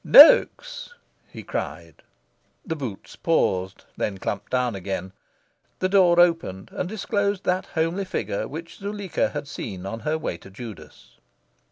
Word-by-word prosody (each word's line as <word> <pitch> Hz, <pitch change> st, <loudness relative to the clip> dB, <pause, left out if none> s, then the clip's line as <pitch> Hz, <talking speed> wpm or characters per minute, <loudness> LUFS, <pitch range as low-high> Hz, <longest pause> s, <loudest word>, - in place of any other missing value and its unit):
"Noaks!" -, -, +7 dB, 0.3 s
he -, -, -10 dB
cried. -, -, -5 dB, 0.6 s
The 160 Hz, -, -2 dB
boots 125 Hz, -10 st, -7 dB
paused, 95 Hz, -, 0 dB
then 100 Hz, -2 st, -1 dB
clumped 100 Hz, +1 st, -4 dB
down 125 Hz, -2 st, +1 dB
again. 95 Hz, -1 st, -4 dB, 0.7 s
The 185 Hz, -, 0 dB
door 180 Hz, -3 st, +5 dB
opened 165 Hz, -, +2 dB
and 180 Hz, -, -3 dB
disclosed 200 Hz, -1 st, -1 dB
that 185 Hz, +1 st, 0 dB
homely 165 Hz, +4 st, -1 dB
figure 185 Hz, -, -2 dB
which 165 Hz, +4 st, -8 dB
Zuleika 200 Hz, -2 st, -1 dB
had 145 Hz, -1 st, -5 dB
seen 95 Hz, -8 st, -6 dB
on 115 Hz, +4 st, -4 dB
her 155 Hz, +7 st, -1 dB
way 90 Hz, -, -3 dB
to 95 Hz, -, -14 dB
Judas. 110 Hz, +2 st, -11 dB
160 Hz, 140 wpm, -24 LUFS, -, 0.7 s, Noaks